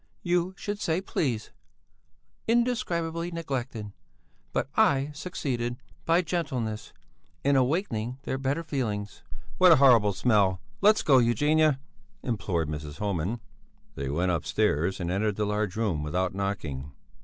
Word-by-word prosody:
"You 175 +1 +1
should 205 0 -4
say 165 +1 +1
please! 130 - -2 1.0
Indescribably 180 -9 0
neglected, 130 -10 -4 0.6
but - - -1
I 145 -10 +3
succeeded, 125 -7 -3 0.3
by 170 +2 +3
gentleness, 130 -11 -3 0.5
in 140 0 +3
awakening 130 - 0
their 130 - -2
better 140 +5 -1
feelings." 110 -10 -3 0.4
"What 185 -1 +8
a - - +7
horrible 120 -7 +6
smell! 100 -3 +2 0.2
Let's 210 +2 +5
go, 135 -4 +6
Eugenia," 145 +4 +3 0.4
implored 95 - -1
Mrs. 75 -1 -6
Homan. 100 +2 -2 0.5
They 70 -1 -4
went 85 +6 +1
upstairs 85 +2 0
and 85 -1 -2
entered 105 +2 0
the 105 - 0
large 105 -2 -1
room 105 -9 0
without 90 +5 -1
knocking. 75 -9 -3
120 Hz, 125 wpm, -27 LUFS, 100-160 Hz, 1.0 s, What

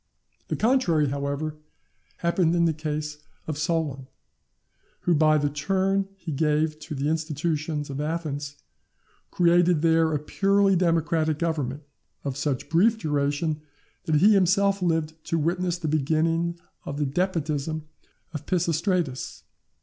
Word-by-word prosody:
The - - -1
contrary, 185 - +2
however, 140 +2 -3 0.6
happened 170 0 +1
in 170 -1 +3
the 165 - +2
case 150 -1 -4 0.3
of 155 - -3
Solon; 155 -5 -1 0.9
who 175 - +2
by 155 0 +4
the 145 -1 +1
turn 195 +6 0
he 175 -4 -7
gave 155 +1 +1
to 155 0 -7
the 140 +1 -1
institutions 155 -1 -1
of 140 +1 -4
Athens, 150 -3 -3 0.7
created 175 -2 +3
there 165 -1 +4
a 150 - +1
purely 195 +6 +2
democratic 165 -3 +1
government, 150 -4 -2 0.4
of 140 -2 -3
such 140 -2 -2
brief 205 +8 +3
duration, 150 -2 -1 0.4
that 160 - +1
he 200 +8 +6
himself 195 +1 +3
lived 160 -2 -1
to 165 - 0
witness 175 +2 0
the 170 -2 -4
beginning 165 +3 +1 0.3
of 140 - -5
the 145 - 0
despotism 155 -1 -1 0.5
of 150 -1 -6
Pisistratus. 170 -4 -1
160 Hz, 130 wpm, -25 LUFS, 150-175 Hz, 0.9 s, he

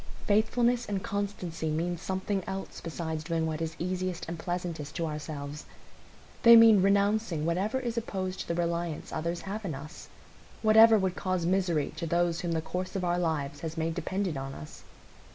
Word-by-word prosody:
Faithfulness 235 +3 +2
and 195 -2 -2
constancy 190 -5 -3
mean 170 +3 -1
something 190 +2 -2
else 190 0 -5
besides 160 -1 -4
doing 165 0 -1
what 160 0 -3
is 160 0 -3
easiest 185 0 -3
and 165 0 -5
pleasantest 175 -4 -4
to 165 - -1
ourselves. 150 -1 -5 0.8
They 235 0 +9
mean 225 -3 +8
renouncing 200 -4 +2
whatever 195 +9 0
is 240 -2 -3
opposed 190 -4 -4
to - - -5
the 170 - -1
reliance 170 -2 -2
others 170 +2 -2
have 200 +6 -5
in 170 -7 -3
us,—whatever 215 +8 +2
would 190 -2 0
cause 185 -2 -1
misery 175 -4 +1
to 170 - -3
those 170 0 +1
whom 175 -3 -2
the 160 -1 -1
course 185 +3 -4
of 190 - -1
our 175 0 +1
lives 145 -4 -1
has 165 0 -5
made 165 0 0
dependent 180 0 -2
on 135 0 -5
us. 75 - -10
175 Hz, 170 wpm, -29 LUFS, 160-195 Hz, 0.8 s, They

